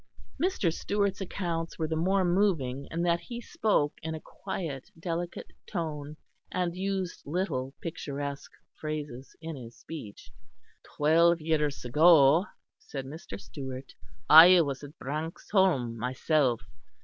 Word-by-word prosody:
Mr. 330 - +1
Stewart's 200 0 -1
accounts 170 -3 -3
were 160 - -1
the 160 - -2
more 185 +4 +2
moving 170 -8 +1
in 170 +1 -2
that 170 -1 +2
he 240 +4 -7
spoke 210 -10 +1
in 160 0 -4
a - - -6
quiet 165 -6 -6
delicate 170 0 -4 0.2
tone, 150 -5 -4 0.3
and 180 -2 -1
used 190 -1 -2
little 140 -5 -2
picturesque 140 -3 -5 0.3
phrases 150 -4 -5
in 165 -1 -5
his 120 -3 -10
speech. 145 -11 -9 0.7
"Twelve 165 +3 +5
years 150 -4 0
ago," 155 - +6 0.3
said 135 -2 -7
Mr. 135 - -8
Stewart, 130 +4 -8 0.3
"I 170 +3 +10
was 140 -3 -3
at 145 +1 -11
Branxholme 155 - 0
myself. 125 +1 +1
160 Hz, 125 wpm, -29 LUFS, 140-175 Hz, 0.7 s, I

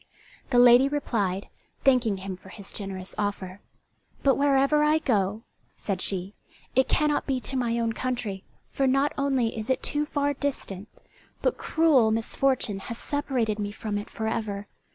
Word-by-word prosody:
The 250 - +2
lady 245 +2 +7
replied, 205 -10 -1 0.4
thanking 245 -6 +3
him 190 0 -5
for 190 +1 -15
his 200 0 -9
generous 190 -2 -6
offer. 200 -2 -3 0.6
"But 275 - +5
wherever 280 +1 +3
I 305 +1 +4
go," 215 -7 0 0.3
said 190 -3 -3
she, 190 +1 -2 0.4
"it 260 +1 +4
cannot 300 -1 +1
be 265 -2 0
to 270 - 0
my 235 -2 0
own 230 -1 0
country, 230 -6 -3 0.3
for 270 - +1
not 275 +2 +2
only 270 -5 0
is 220 +1 -5
it 260 - +1
too 295 0 -1
far 285 -1 0
distant, 230 -8 -5 0.4
but - - +1
cruel 305 -9 +4
misfortune 225 -1 0
has 230 - -4
separated 250 -8 -1
me 205 -1 -2
from 205 -1 -3
it 205 - -8
for 220 - -4
ever. 210 -3 -3
235 Hz, 160 wpm, -26 LUFS, 205-275 Hz, 0.6 s, lady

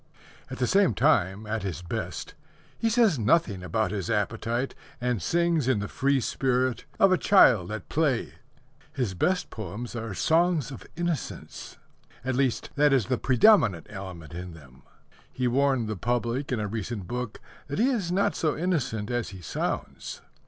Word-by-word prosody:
At - - -6
the 125 - +1
same 195 +5 +3
time, 105 - +2
at 110 +1 -2
his 90 -3 -4
best, 85 - -5 0.4
he 230 - 0
says 220 - +3
nothing 110 - +2
about 100 +5 -1
his 100 -4 -3
appetite, 115 +4 -1 0.3
and 125 -4 -1
sings 170 -5 +1
in 130 -4 +3
the 105 0 -3
free 140 +3 +1
spirit 130 -1 0
of 195 - +6
a 185 - +3
child 115 - +5
at 110 -4 -5
play. 145 -6 0 0.6
His 125 -8 -1
best 180 - 0
poems 110 +3 -6
are 115 -4 -4
songs 165 - +2
of 130 - -9
innocence. 170 -3 -4 0.5
At 130 - 0
least, 130 -1 0
that 145 0 +4
is 130 -6 +3
the 125 -1 -1
predominant 125 - +4
element 95 -6 -8
in 90 0 -7
them. 65 -5 -16 0.5
He 125 -1 -1
warned 130 -2 +2
the 110 - -2
public 120 +6 -1
in 125 - 0
a 105 - -1
recent 110 -1 -4
book 125 0 -4 0.3
that 145 - -4
he 245 +6 +3
is 200 -9 -1
not 195 +2 +1
so 155 -3 0
innocent 130 - -1
as 120 -1 -1
he 95 -1 -10
sounds. 80 - -4
125 Hz, 165 wpm, -27 LUFS, 105-150 Hz, 0.6 s, of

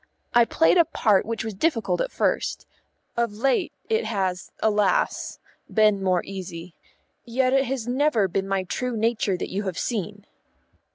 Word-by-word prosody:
I 240 -1 +6
played 325 +9 +3
a 335 - +6
part 210 -9 +2
which 225 -1 -3
was 220 - -4
difficult 235 - 0
at - - -2
first; - - -1 0.5
of 235 -3 0
late, 250 +5 +1 0.2
it 450 0 +1
has, 190 -4 -2
alas! 210 -2 +1 0.3
been 215 -3 +4
more 185 -2 +1
easy. 180 -3 -7 0.5
Yet 255 +2 +1
it 270 0 +3
has 255 -3 -3
never 250 -5 +2
been 190 +2 -2
my 195 -1 0
true 245 +6 -3
nature 215 -4 +1
that - - -5
you 195 - -1
have 185 -2 -3
seen." 210 -2 -3
215 Hz, 160 wpm, -24 LUFS, 195-250 Hz, 0.5 s, I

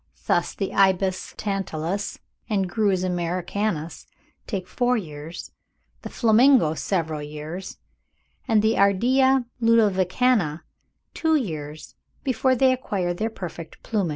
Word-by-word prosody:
Thus - - +1
the 195 - -3
Ibis 190 -1 +1
tantalus 195 -2 -3 0.3
and 195 -3 +1
Grus 195 -1 +1
americanus 175 -1 -2 0.4
take 190 -5 -4
four 250 +3 +1
years, 160 -3 -7 0.5
the - - -7
Flamingo 230 - +4
several 160 -3 -2
years, 150 +5 -7 0.7
and 220 -3 +3
the 220 +1 +2
Ardea 255 +7 +3 0.2
ludovicana 210 -5 +2 0.5
two 320 -1 +1
years, 155 - -4 0.3
before 260 0 +2
they 260 +1 +4
acquire 195 -8 -2
their 215 +6 -2
perfect 170 -6 -9
plumage. 205 -6 -1
195 Hz, 110 wpm, -24 LUFS, 170-230 Hz, 0.7 s, Flamingo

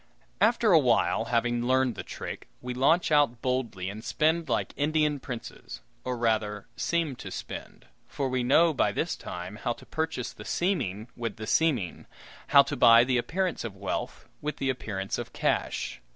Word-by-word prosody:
After 225 0 +4
awhile, 125 -7 +4
having 120 0 +1
learned 130 -1 +3
the - - -6
trick, - - -7
we 125 0 -5
launch 155 +7 +3
out 145 -6 +3
boldly 125 -8 -1
and 105 +3 -6
spend 160 +4 +1
like - - 0
Indian 150 0 +1
Princes 125 -3 -8 0.2
or 125 -1 -2
rather 110 -3 0
seem 165 -5 0
to - - -7
spend; - - -8 0.2
for 140 - -2
we 130 -1 0
know, 160 +7 +4
by 135 - +2
this - - -1
time, 90 +4 -7
how 120 - -1
to - - -15
purchase 160 -6 -3
the 105 - -10
seeming 120 - -1
with 115 -4 -4
the 110 - -6
seeming, 125 - +1 0.4
how - - +8
to - - -4
buy 115 0 +7
the 125 0 +1
appearance 180 +8 -1
of 110 -4 -6
wealth 95 -1 -4
with 150 +1 -3
the 135 -1 +1
appearance 100 -6 -4
of - - -6
cash. - - -1
125 Hz, 170 wpm, -28 LUFS, 115-150 Hz, 0.4 s, how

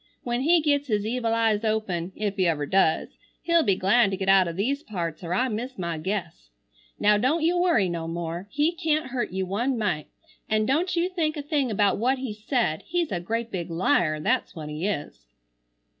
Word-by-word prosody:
When 240 0 -1
he 330 +4 +4
gets 285 -1 +1
his 210 -3 0
evil 230 0 0
eyes 225 -2 +2
open, 200 -6 -1
if 205 -2 -2
he 185 -3 +2
ever 150 -3 0
does, 190 -1 +2 0.3
he'll 335 -1 +4
be 200 -11 +2
glad 200 +4 +3
to 190 - -3
get 190 0 -2
out 190 -2 +6
o' - - -2
these 240 - -1
parts 170 - -5
or 170 - -5
I 220 +9 +2
miss 245 +3 -4
my 170 -3 -3
guess. 170 - -4 0.5
Now 210 0 +4
don't 300 +8 +1
you 340 +2 +3
worry 345 - +3
no 170 -2 -3
more. 170 +2 -4
He 295 +7 +1
can't 310 -5 -1
hurt 245 -2 -1
you 190 +1 -2
one 235 +8 -1
mite. 185 -9 -1 0.4
An' 215 0 +2
don't 330 - +1
you 340 +1 +2
think 330 -4 -1
a 290 - -4
thing 285 -3 0
about 205 -2 +2
what 255 +4 +2
he 255 -4 -4
said. 215 - -1
He's 345 -5 -1
a 180 - -1
great 230 +6 -3
big 175 -2 -4
liar, 165 -2 +1
that's 150 - 0
what 155 -2 -6
he 155 +5 -3
is." 145 - -5
215 Hz, 210 wpm, -25 LUFS, 180-265 Hz, 0.5 s, out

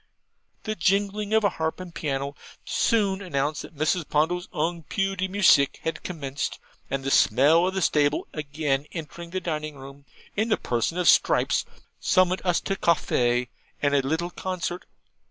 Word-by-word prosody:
The 215 - -2
jingling 205 0 0
of 220 0 +3
a 200 - +4
harp 160 -1 -3
and 180 -2 -8
piano 140 -2 -3 0.3
soon 200 -4 +1
announced 145 -6 -1
that 160 - -11
Mrs. 155 +2 0
Ponto's 175 +4 +1
ung 165 +2 -1
PU 195 +5 -2
DE 190 0 -1
MUSICK 185 -8 +4
had 165 - -3
commenced, 140 -6 -4 0.3
and 135 0 -2
the 135 - -1
smell 155 +9 +5
of 190 - -3
the 190 - 0
stable 145 -2 +2
again 145 -2 -2
entering 170 +1 -7
the 185 +2 -2
dining 155 -4 -4
room, 140 +1 -12 0.3
in 220 +3 0
the 215 - +3
person 120 +8 -1
of 180 - +1
Stripes, - - +4 0.3
summoned 185 0 +2
us 180 -2 +2
to 195 - -2
CAFFY 125 -9 +1 0.3
and 145 -1 +2
the 140 - +4
little 160 +6 -2
concert. 180 -1 -4
165 Hz, 165 wpm, -25 LUFS, 145-185 Hz, 0.3 s, smell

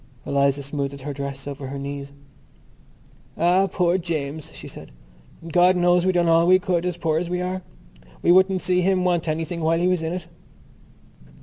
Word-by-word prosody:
Eliza 140 0 +1
smoothed 140 -1 -4
her 145 +2 -5
dress 140 0 -6
over 140 -1 -6
her 140 +1 -6
knees. 140 0 -6 1.3
"Ah, 180 +3 +3
poor 180 +1 +1
James!" 155 -3 -4
she - - -10
said. - - -11 0.6
"God 180 +2 +5
knows 175 0 +3
we - - +4
done 175 -2 +1
all 165 +1 +4
we 185 +1 +7
could, 180 -1 -1
as 180 -1 -3
poor 160 -2 0
as 175 0 -4
we 180 0 -1
are—we 175 - -4
wouldn't 190 +1 +4
see 180 0 +2
him 185 0 +1
want 175 -2 +1
anything 165 +2 -2
while 160 +1 +2
he 175 +2 +1
was 180 -2 +1
in 160 +1 -3
it." 180 -2 -5
170 Hz, 180 wpm, -23 LUFS, 140-180 Hz, 1.3 s, we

